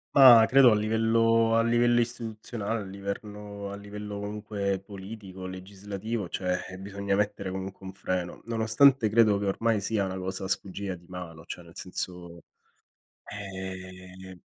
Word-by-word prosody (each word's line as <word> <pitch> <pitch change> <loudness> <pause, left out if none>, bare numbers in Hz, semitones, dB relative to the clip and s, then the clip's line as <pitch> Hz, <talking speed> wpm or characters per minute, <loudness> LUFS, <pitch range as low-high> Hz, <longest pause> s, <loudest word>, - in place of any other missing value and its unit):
Ma 125 -5 +10
credo 130 -1 +7
a - - +5
livello 115 +1 +3
a 115 - +5
livello 120 +1 +4
istituzionale, 115 -2 -4
a - - -5
liverno 100 +1 -6
a 100 - -6
livello 105 0 -7
comunque 100 -1 -2
politico, 95 -1 -9
legislativo, 100 +3 -5
cioè, 90 +1 -2
ehm, 95 0 -9
bisogna 100 0 -2
mettere 100 -1 -1
comunque 95 +1 -6
un 95 - -7
freno, 90 -2 -3
nonostante 115 +3 +4
credo 105 -1 +4
che 100 - -2
ormai 110 +3 +1
sia 100 0 0
una 95 0 -3
cosa 95 0 -4
sfuggita 95 0 -3
di 85 0 -17
mano, 85 -3 -8
cioè 90 - -7
nel 85 0 -15
senso, 90 -2 -6 0.8
ehm 95 -2 -8
100 Hz, 145 wpm, -28 LUFS, 95-110 Hz, 0.8 s, Ma